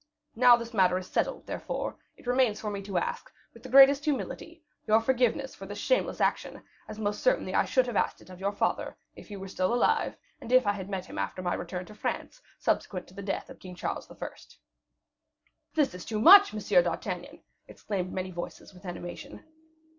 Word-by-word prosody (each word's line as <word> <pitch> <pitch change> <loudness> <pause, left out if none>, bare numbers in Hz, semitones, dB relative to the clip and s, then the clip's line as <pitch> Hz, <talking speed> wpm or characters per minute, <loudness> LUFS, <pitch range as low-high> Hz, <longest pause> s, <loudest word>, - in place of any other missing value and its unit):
Now 245 +1 +7
this 235 0 -8
matter 185 -3 +3
is 185 - -5
settled, - - -2
therefore, - - -4 0.2
it - - -18
remains 245 -3 +2
for 210 - -4
me 200 -1 -4
to 195 -2 -4
ask, 170 - -3 0.2
with 230 - -15
the 260 - -10
greatest 275 +2 +7
humility, 315 +3 -3 0.2
your 220 +1 +5
forgiveness 255 +2 +1
for 195 - -10
this 205 +1 -7
shameless - - 0
action, - - -1 0.2
as 215 - -8
most 205 -1 -2
certainly - - +1
I - - +3
should 255 -2 +2
have 245 -3 -5
asked - - 0
it - - -15
of 180 - -11
your 200 +1 -1
father, 205 - -1 0.2
if - - -13
he 205 - -8
were 195 0 -7
still 185 +1 -1
alive, 240 - +1 0.2
and 235 - -8
if 255 -2 +5
I 205 - +3
had 195 -1 -6
met 190 -2 -3
him - - -7
after 185 - -3
my 175 - 0
return 180 +1 -5
to 215 - -13
France, 355 - -4 0.2
subsequent 180 -3 -1
to - - -17
the 200 - -8
death 195 0 -4
of - - -13
King 180 -1 -10
Charles - - -4
I." - - -12 1.6
"That 295 -4 +2
is 180 -1 -8
too 215 -2 -3
much, 395 - +9
M. 205 -4 +3
d'Artagnan," 175 +1 -5 0.2
exclaimed 185 -3 -4
many 185 0 -4
voices, 175 +3 -8
with 185 +1 -13
animation. 175 +10 -8
205 Hz, 205 wpm, -28 LUFS, 185-250 Hz, 1.6 s, much